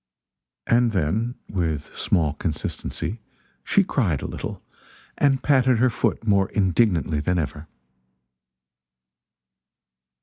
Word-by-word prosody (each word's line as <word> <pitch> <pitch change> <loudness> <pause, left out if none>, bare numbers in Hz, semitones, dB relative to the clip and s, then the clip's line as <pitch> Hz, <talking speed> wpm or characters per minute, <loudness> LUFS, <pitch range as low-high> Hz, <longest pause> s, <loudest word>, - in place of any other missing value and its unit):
And 120 -1 +3
then, 105 +8 0
with 80 -6 -3
small 80 -4 +1
consistency, 105 +8 -4 0.4
she 200 - +3
cried 100 - 0
a - - -3
little, - - -5 0.6
and 135 -2 +2
patted 130 -4 +4
her 125 +2 +3
foot 115 - -1
more 100 -3 +3
indignantly 90 -5 +1
than 90 +5 0
ever. 75 -1 -3
100 Hz, 100 wpm, -24 LUFS, 80-120 Hz, 0.6 s, patted